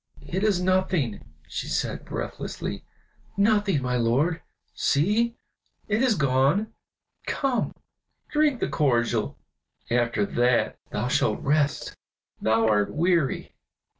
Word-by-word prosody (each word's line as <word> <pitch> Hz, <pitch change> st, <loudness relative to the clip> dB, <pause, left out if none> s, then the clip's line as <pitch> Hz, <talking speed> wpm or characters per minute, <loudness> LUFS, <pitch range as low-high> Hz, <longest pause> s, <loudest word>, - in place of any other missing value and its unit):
"It 190 Hz, +3 st, -2 dB
is 205 Hz, -4 st, +3 dB
nothing!" 180 Hz, -, +1 dB, 0.2 s
she -, -, -4 dB
said, -, -, -2 dB
breathlessly, -, -, -5 dB, 0.5 s
"nothing, 200 Hz, -7 st, +2 dB
my 125 Hz, 0 st, 0 dB
lord! 140 Hz, +9 st, +1 dB, 0.3 s
See! 210 Hz, +11 st, +1 dB, 0.5 s
it 215 Hz, +2 st, +1 dB
is 255 Hz, -4 st, +3 dB
gone. 140 Hz, +10 st, +2 dB, 0.5 s
Come, 265 Hz, -4 st, 0 dB, 0.5 s
drink 300 Hz, -4 st, +1 dB
the -, -, +1 dB
cordial, 120 Hz, -, +1 dB, 0.5 s
after 120 Hz, -3 st, +2 dB
that 120 Hz, +3 st, +1 dB
thou -, -, -2 dB
shalt -, -, +1 dB
rest; 145 Hz, 0 st, 0 dB, 0.5 s
thou 110 Hz, 0 st, +3 dB
art 105 Hz, -2 st, +2 dB
weary." 170 Hz, -4 st, +1 dB
150 Hz, 105 wpm, -26 LUFS, -, 0.5 s, is